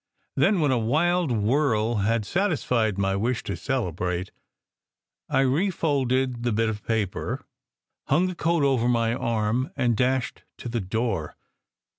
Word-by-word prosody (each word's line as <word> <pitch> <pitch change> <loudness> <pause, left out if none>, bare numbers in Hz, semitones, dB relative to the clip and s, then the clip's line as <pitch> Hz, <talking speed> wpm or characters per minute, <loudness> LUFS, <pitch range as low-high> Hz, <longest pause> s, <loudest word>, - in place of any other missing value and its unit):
Then, 195 -5 +3
when 145 -3 +2
a 125 - +2
wild 160 +7 +1
whirl 115 0 +1
had 105 +2 +1
satisfied 125 - 0
my 95 -1 +1
wish 120 +5 -1
to 100 - -3
celebrate, 90 - -2 1.0
I - - +3
refolded 135 -5 +1
the 120 0 0
bit 110 +1 +1
of 105 -1 -4
paper, 110 -5 -2 0.6
hung 155 +7 +3
the 185 - -2
coat 165 -2 +1
over 130 -4 +2
my 115 -1 +2
arm, 115 +1 0
and 125 -4 +1
dashed 125 +2 0 0.2
to 120 - -6
the 115 -1 -2
door. 100 -3 -2
120 Hz, 140 wpm, -25 LUFS, 110-140 Hz, 1.0 s, Then